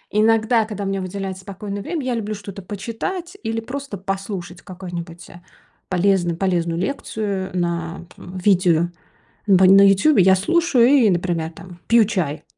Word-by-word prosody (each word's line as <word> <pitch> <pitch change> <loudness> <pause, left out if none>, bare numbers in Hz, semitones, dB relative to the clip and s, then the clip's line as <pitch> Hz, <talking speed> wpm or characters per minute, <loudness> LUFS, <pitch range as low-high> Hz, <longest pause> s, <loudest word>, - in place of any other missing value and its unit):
иногда, 225 +1 +3
когда 210 -2 -6
у - - -2
меня 195 0 -2
выделяется 190 0 -5
спокойное 200 +1 -6
время, 315 - -4
я 255 - -1
люблю 215 -2 -3
что-то 200 -1 -9
почитать 235 - -5
или 225 0 -2
просто 275 -1 -6
послушать 190 -2 -5
какую-нибудь, 175 -2 -8
э, 175 - -14 0.5
полезную 180 -2 +1
полезную 170 -3 0
лекцию 200 -3 -3
на 170 -1 -3
п - - -14 0.2
видео 175 -4 +3 0.6
бань 190 -1 +6
на 195 - +8
"Ютубе". 200 +5 +4
Я 190 +1 +6
слушаю 270 - +3
и, 260 -6 +5
например, 175 -2 -1
там 175 +1 -13
пью 230 -1 +6
чай. 180 -9 -2
195 Hz, 155 wpm, -21 LUFS, 180-220 Hz, 0.6 s, на